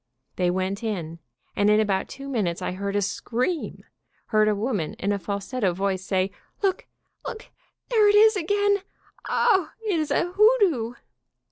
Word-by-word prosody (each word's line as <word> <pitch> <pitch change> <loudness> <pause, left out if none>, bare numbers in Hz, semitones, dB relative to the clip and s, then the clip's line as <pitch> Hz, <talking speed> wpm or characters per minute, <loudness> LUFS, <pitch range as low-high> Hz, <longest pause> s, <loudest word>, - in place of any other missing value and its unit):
They 180 -1 +1
went 190 +4 -2
in, 170 -7 -4 0.4
and 205 0 +3
in 210 0 +5
about 200 -3 0
two 275 +1 -8
minutes 205 -11 -1
I - - -3
heard 200 +2 -4
a 205 - +2
scream, 250 - -2 0.5
heard 215 -1 +3
a 210 - +2
woman 205 -7 -2
in 200 - -2
a 200 - 0
falsetto 200 +1 -2
voice 190 0 -1
say: 190 0 0 0.3
"Look! 380 -2 0 0.4
Look! 440 - -8 0.4
There 435 -3 +5
it 410 - +4
is 435 +1 +7
again! 405 +3 +2 0.5
O, 390 -8 +3 0.2
it 385 -6 +1
is 310 - -1
a 350 - 0
hoodoo!" 380 - +3
220 Hz, 160 wpm, -25 LUFS, -, 0.5 s, is